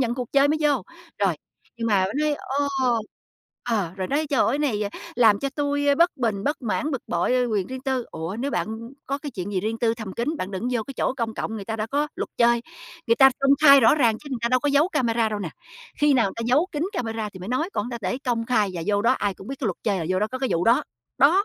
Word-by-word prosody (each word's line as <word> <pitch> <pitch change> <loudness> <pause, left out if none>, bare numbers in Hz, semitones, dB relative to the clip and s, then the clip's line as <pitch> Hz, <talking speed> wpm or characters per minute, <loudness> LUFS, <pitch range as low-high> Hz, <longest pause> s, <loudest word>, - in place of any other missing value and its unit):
nhận 240 -2 +1
cuộc 250 -2 -5
chơi 280 +1 +5
mới 310 - +1
vô. 285 -8 +2 0.4
Rồi. 195 -5 +2 0.4
Nhưng 230 - -3
mà 195 -4 +3
nói, 305 -1 +2 0.2
ồ 285 0 +1 1.0
ờ, 195 -7 0
rồi 185 -1 -3
nói: 300 +3 0
"Trời 270 - +2
ơi! 275 - +1
Này, 245 -9 0
ờ, 200 - -1 0.3
làm 220 -4 +5
cho 275 - -2
tui, 285 0 -1
a, 285 - +5
bất 340 +4 +3
bình, 215 -5 -1
bất 290 -2 -1
mãn, 295 +7 -1
bực 265 - -3
bội, 175 +8 0
a, 250 -1 +3
quyền 210 -6 -1
riêng 260 0 -6
tư." 260 -3 -1
Ủa, 165 +5 -5
nếu 280 - -1
bạn 220 - -1 0.4
có 275 +1 -2
cái 290 -1 -6
chuyện 200 -2 -5
gì 185 - 0
riêng 225 +2 -2
tư 230 -1 +1
thầm 215 -4 -7
kín, 280 +7 -2
bạn 185 - -4
đừng 200 +5 -3
vô 235 -3 0
cái 275 - -9
chỗ - - 0
công 230 -2 -2
cộng, 220 - -4
người 205 - -6
ta 225 +2 -4
đã 215 - -2
có 290 +5 0
luật - - -3
chơi, 235 0 +4 0.4
người 230 - +3
ta 270 -1 +8
công 275 0 +4
khai 280 -2 +9
rõ 230 - +6
ràng 235 -7 +2
chứ 295 - -12
người 255 - -2
ta 235 - +2
đâu 255 0 +2
có 290 - 0
giấu 290 +5 +3
camera 235 -7 +1
đâu 210 -1 -3
nè. 180 -5 -4 0.5
Khi 295 -1 +4
nào 225 -7 +3
ta 230 - -3
giấu 290 +9 +3
kín 295 +1 -2
camera 225 - -3
thì 185 - -11
mới 185 - -7
nói, 310 +9 -1
còn 225 +5 -2
ta 235 - -4
để 195 +5 -2
công 230 -2 -1
khai 215 -6 +2
và 170 - -4
vô 205 0 +1
đó 235 - +4
ai 205 -6 -1
cũng 190 - -12
biết 275 - -4
cái 240 - -1
luật 185 - -2
chơi 200 -4 +1
là 165 - -3
vô 185 0 +1
đó 210 - +2
có 260 +3 -5
cái 265 -1 -1
vụ 170 +1 +1
đó. 230 +2 +4 0.4
Đó. 355 +9 +5
235 Hz, 285 wpm, -24 LUFS, 210-275 Hz, 1.0 s, khai